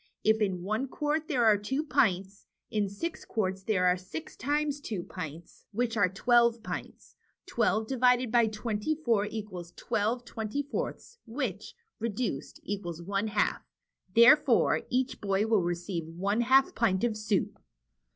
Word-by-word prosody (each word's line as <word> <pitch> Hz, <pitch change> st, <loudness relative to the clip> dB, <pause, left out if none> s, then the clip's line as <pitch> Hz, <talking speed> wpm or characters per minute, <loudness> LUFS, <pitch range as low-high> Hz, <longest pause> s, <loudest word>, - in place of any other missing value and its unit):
If 220 Hz, 0 st, +3 dB
in 185 Hz, -4 st, 0 dB
one 215 Hz, +7 st, -1 dB
quart 300 Hz, +3 st, -1 dB
there 250 Hz, -6 st, +2 dB
are 210 Hz, -2 st, +5 dB
two 265 Hz, +9 st, -2 dB
pints^ 195 Hz, -, +1 dB, 0.3 s
in 210 Hz, -2 st, 0 dB
six 320 Hz, -, -5 dB
quarts 190 Hz, -4 st, -2 dB
there 190 Hz, -2 st, +1 dB
are 180 Hz, 0 st, +5 dB
six 180 Hz, -4 st, -8 dB
times 290 Hz, +2 st, -1 dB
two 205 Hz, -10 st, -4 dB
pints, 165 Hz, -2 st, -9 dB
which 235 Hz, +2 st, -1 dB
are 200 Hz, -4 st, +3 dB
twelve 235 Hz, +3 st, +3 dB
pints. -, -, -7 dB, 0.3 s
Twelve 220 Hz, +1 st, +1 dB
divided 250 Hz, -1 st, +2 dB
by 235 Hz, -2 st, +4 dB
twenty 215 Hz, +5 st, -2 dB
four 230 Hz, -9 st, +1 dB
equals 195 Hz, -5 st, -7 dB
twelve 230 Hz, +4 st, -1 dB
twenty 225 Hz, +6 st, -3 dB
fourths, 470 Hz, +10 st, -5 dB
which, 245 Hz, +6 st, -4 dB, 0.2 s
reduced, 220 Hz, -, -3 dB
equals 180 Hz, -5 st, -4 dB
one 195 Hz, +4 st, -2 dB
half. 205 Hz, -1 st, 0 dB, 0.5 s
Therefore, 240 Hz, +2 st, +6 dB
each 255 Hz, +1 st, -1 dB
boy 200 Hz, 0 st, +1 dB
will 220 Hz, -3 st, +3 dB
receive 175 Hz, -1 st, -3 dB
one 195 Hz, +7 st, -1 dB
half 265 Hz, +3 st, +4 dB
pint 215 Hz, -3 st, +1 dB
of 235 Hz, -3 st, +1 dB
soup." 215 Hz, -2 st, -1 dB
215 Hz, 150 wpm, -29 LUFS, 195-245 Hz, 0.5 s, Therefore